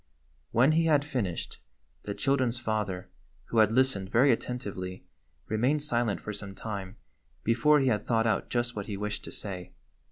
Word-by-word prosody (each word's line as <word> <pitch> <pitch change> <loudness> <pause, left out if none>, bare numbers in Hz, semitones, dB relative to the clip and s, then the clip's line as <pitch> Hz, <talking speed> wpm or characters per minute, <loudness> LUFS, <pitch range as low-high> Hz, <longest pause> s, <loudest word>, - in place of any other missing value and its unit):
When 130 +6 +4
he 165 +1 +3
had 150 -3 +3
finished, 120 - -3 0.5
the 100 - -3
children's 130 -4 +1
father, 105 - -2 0.4
who 115 - +2
had 110 -1 +5
listened 120 -6 +2
very 125 +6 +5
attentively, 100 -7 -3 0.4
remained 130 +7 +1
silent 120 -7 0
for 105 - -5
some 100 -1 -7
time 100 -2 -6 0.5
before 125 +7 +4
he 135 - +2
had 105 -3 0
thought 115 -1 +2
out 110 -3 +1
just 120 0 -1
what 100 -1 -4
he 100 -3 -4
wished 105 +1 -3
to - - -7
say. 90 -3 -5
115 Hz, 165 wpm, -29 LUFS, 100-130 Hz, 0.5 s, had